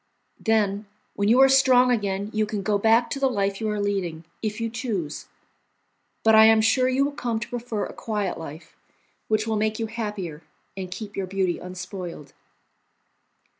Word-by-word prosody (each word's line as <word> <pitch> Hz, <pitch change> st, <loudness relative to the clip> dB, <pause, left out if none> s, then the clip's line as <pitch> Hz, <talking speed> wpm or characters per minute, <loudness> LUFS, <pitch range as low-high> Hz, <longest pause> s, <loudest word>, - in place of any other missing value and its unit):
Then, 210 Hz, -2 st, +1 dB, 0.3 s
when 200 Hz, +1 st, +1 dB
you 240 Hz, +3 st, +5 dB
are 270 Hz, -, +8 dB
strong 255 Hz, -2 st, +5 dB
again, 200 Hz, -2 st, -1 dB
you 215 Hz, 0 st, +1 dB
can 205 Hz, -2 st, -3 dB
go 205 Hz, 0 st, +1 dB
back 225 Hz, +3 st, +4 dB
to 275 Hz, -, -2 dB
the 270 Hz, -1 st, +2 dB
life 200 Hz, -3 st, -1 dB
you 220 Hz, -, -1 dB
are 210 Hz, 0 st, -2 dB
leading, 185 Hz, -6 st, -2 dB, 0.2 s
if 215 Hz, 0 st, -3 dB
you 230 Hz, -, -1 dB
choose; 225 Hz, -, -4 dB, 1.0 s
but 220 Hz, -, +5 dB
I 220 Hz, 0 st, +9 dB
am 220 Hz, 0 st, +6 dB
sure 255 Hz, +4 st, +3 dB
you 265 Hz, +2 st, +2 dB
will 285 Hz, -, -2 dB
come 240 Hz, -5 st, -2 dB
to -, -, -5 dB
prefer 235 Hz, -3 st, -3 dB
a -, -, -8 dB
quiet 210 Hz, -6 st, -3 dB
life, 160 Hz, 0 st, -10 dB, 0.5 s
which 215 Hz, 0 st, +1 dB
will 220 Hz, -1 st, -1 dB
make 215 Hz, 0 st, 0 dB
you 225 Hz, -, -2 dB
happier 210 Hz, -8 st, -5 dB, 0.3 s
and 190 Hz, -1 st, -5 dB
keep 210 Hz, +2 st, -7 dB
your 195 Hz, -1 st, -3 dB
beauty 190 Hz, -2 st, -1 dB
unspoiled." 180 Hz, -5 st, -8 dB
215 Hz, 180 wpm, -24 LUFS, 195-230 Hz, 1.0 s, I